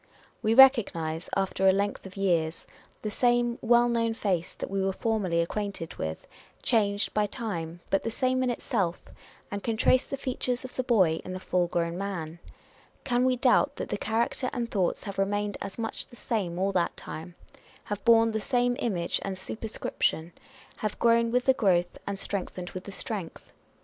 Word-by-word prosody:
Wo 220 +1 +2
recognise, 185 -12 +5
after 195 0 +1
a - - +8
length 200 0 -1
of 190 - -13
years, 170 -4 0 0.4
the 215 - -2
same 240 +1 +2
well 240 +1 +5
known 230 -1 +1
face 185 -6 -1
that - - -6
we 195 0 0
were 195 0 +1
formerly 200 -7 0
acquainted 195 -1 -3
with, 80 0 -4 0.4
changed 205 -3 +1
by 210 -1 +2
time, 175 -8 -5
but 195 - +3
the - - -2
same 255 +2 0
in 255 - +1
itself; 200 -7 -1 0.5
and 200 0 -3
can 225 0 -2
trace 255 +3 +4
the 275 - -4
features 255 -1 -2
of 255 - -10
the - - 0
boy 190 -11 +3
in 185 - -6
the 185 - -4
full 180 -1 +1
grown 170 0 -1
man. 170 -5 -4 0.6
Can 250 -2 +2
we 255 -1 +3
doubt 265 +3 +3
that - - -5
the - - -1
character 235 +3 0
and 235 -2 -3
thoughts 185 -4 0
have 200 -2 -6
remained 205 +1 0
as 195 - -6
much 225 -1 -3
the - - -15
same 200 -8 -2
all 195 +2 +1
that 180 -3 0
time; 170 +2 -8 0.5
have 205 -1 -5
borne 230 -1 +5
the 220 - -1
same 245 +3 +1
image 180 -7 -1
and 195 -1 -3
super 220 +4 -5
scription; 165 -5 -1 0.4
have 215 -2 -3
grown 230 0 +4
with 245 +1 +1
the 265 - +6
growth, 180 -8 +1
and 200 -1 -2
strengthened 185 -2 -4
with 185 - -7
the 200 - -7
strength? 195 -4 -5
205 Hz, 185 wpm, -28 LUFS, 185-235 Hz, 0.6 s, a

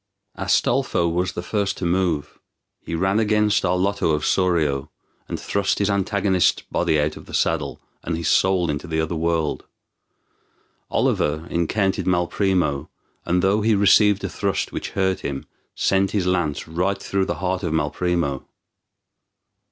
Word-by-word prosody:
Astolpho 85 - +1
was 90 +2 -1
the 85 - -5
first 100 0 -1
to 90 - -3
move. 85 -4 -1 0.4
He 85 - -4
ran 95 +5 +1
against 105 -1 +2
Arlotto 90 -2 +1
of 75 - -3
Sorio, 80 -7 +1 0.4
and - - -4
thrust 100 -1 0
his 100 0 +1
antagonist's 100 -1 +1
body 80 - 0
out 75 +1 -1
of - - -13
the - - -5
saddle, - - 0 0.2
and 80 0 -3
his 85 -1 -3
soul 90 -3 +3
into 75 +3 -5
the 80 -1 -1
other 80 +1 -1
world. 80 -1 -1 1.2
Oliver 80 +2 0
encountered 95 +4 0
Malprimo, 90 -4 +1 0.4
and, 90 +1 +1
though 100 +3 +3
he 110 0 +3
received 100 0 +4
a - - 0
thrust 95 +2 -2
which - - -4
hurt 95 -1 +1
him, 70 -1 -5 0.3
sent 95 0 +2
his 100 -4 +1
lance 90 -6 -1
right 90 +5 -1
through 95 -1 -1
the - - -2
heart 95 0 -2
of 85 -5 -2
Malprimo. 80 -3 -1
90 Hz, 150 wpm, -22 LUFS, 80-95 Hz, 1.2 s, received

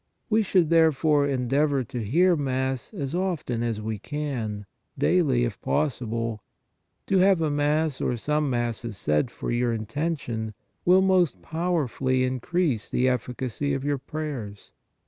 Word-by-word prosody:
We 220 +1 +4
should, 185 -5 +2
therefore, 155 -3 +4
endeavor 135 +1 +1
to 120 -1 -5
hear 175 - +3
Mass 130 -3 -2
as 145 -9 -4
often 170 -10 -1
as 115 -2 -1
we 110 -1 -4
can, 120 -7 -4 0.3
daily, 150 -9 +3
if 115 -6 -3
possible. 115 -6 -1 0.6
To 195 - +2
have 190 -1 +5
a 155 -2 +1
Mass 150 0 +1
or 120 - 0
some 150 +4 0
Masses 120 -3 -2
said 75 +6 +1
for - - -5
your 120 0 +1
intention 115 -2 -3 0.3
will 185 +2 +6
most 185 -4 +2
powerfully 150 -6 0
increase 130 - -1
the 125 - +1
efficacy 130 +2 -1
of 135 - -4
your 145 -1 0
prayers. 135 -10 -6
135 Hz, 140 wpm, -26 LUFS, 120-160 Hz, 0.6 s, will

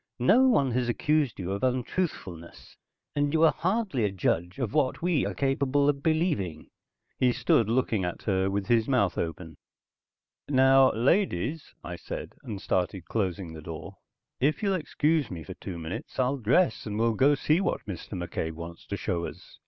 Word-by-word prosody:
"No 220 - +5
one 140 - +3
has 120 0 0
accused 150 0 +1
you 90 0 -4
of 100 +4 -3
untruthfulness, 125 - -3 0.4
and 145 0 +1
you 160 0 +3
are 165 - +7
hardly 190 - 0
a 105 - +2
judge 90 -1 -1
of 125 -6 -2
what 150 0 +1
we 175 -4 +2
are - - -5
capable 140 +1 +1
of 140 -1 +1
believing." 155 - -1 0.5
He 125 -1 +4
stood 115 -2 +2
looking 115 -4 +1
at 90 -1 -4
her 95 -2 +1
with 100 0 -1
his 115 -1 +2
mouth 105 -10 +2
open. 80 -1 -5 0.9
"Now 135 -1 +6
ladies," 140 - 0
I 90 - -6
said, - - -7
and 105 -3 -6
started 95 -1 -1
closing 95 -5 -2
the 80 - -9
door. 80 +4 -8 0.4
"If 150 - +1
you'll 200 -1 +2
excuse 155 -3 0
me 85 -4 -6
for - - -8
two 90 - -7
minutes 80 +1 -7
I'll 130 +2 +1
dress 130 - +2
and 105 0 -3
we'll 115 +1 +2
go 140 +6 +4
see 155 +5 +2
what 195 - -2
Mr. 95 0 -7
McCabe 85 -2 -3
wants 85 +1 -9
to - - -3
show 85 -1 -2
us." - - -13
120 Hz, 175 wpm, -28 LUFS, 90-145 Hz, 0.9 s, are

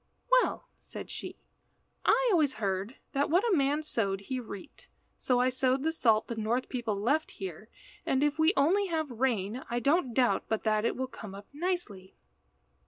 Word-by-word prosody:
"Well," - - -3
said - - -9
she, - - -7 0.7
"I - - +4
always 305 -7 +3
heard 200 +2 -2 0.2
that 280 +1 0
what 355 +6 +3
a 415 - +3
man 290 +1 +1
sowed 200 -9 -1
he 255 +6 -4
reaped, 200 -5 -10 0.3
so 250 -1 +2
I 250 +1 +3
sowed 260 +1 +1
the 320 - +1
salt 225 -8 +3
the 235 - -4
North 225 +4 -1
people 230 -5 -2
left 285 +9 +1
here, 195 +3 -8 0.3
and 270 +1 +1
if 295 +1 +1
we 315 +2 +5
only 380 +8 +3
have 315 -5 -2
rain 235 -1 -1
I 240 0 0
don't 275 -2 +1
doubt 250 -2 +2
but 220 - -1
that 215 0 +1
it - - +1
will 260 - -2
come 215 -6 -9
up 200 +1 -10
nicely." 290 - -3
255 Hz, 180 wpm, -30 LUFS, 215-295 Hz, 0.7 s, we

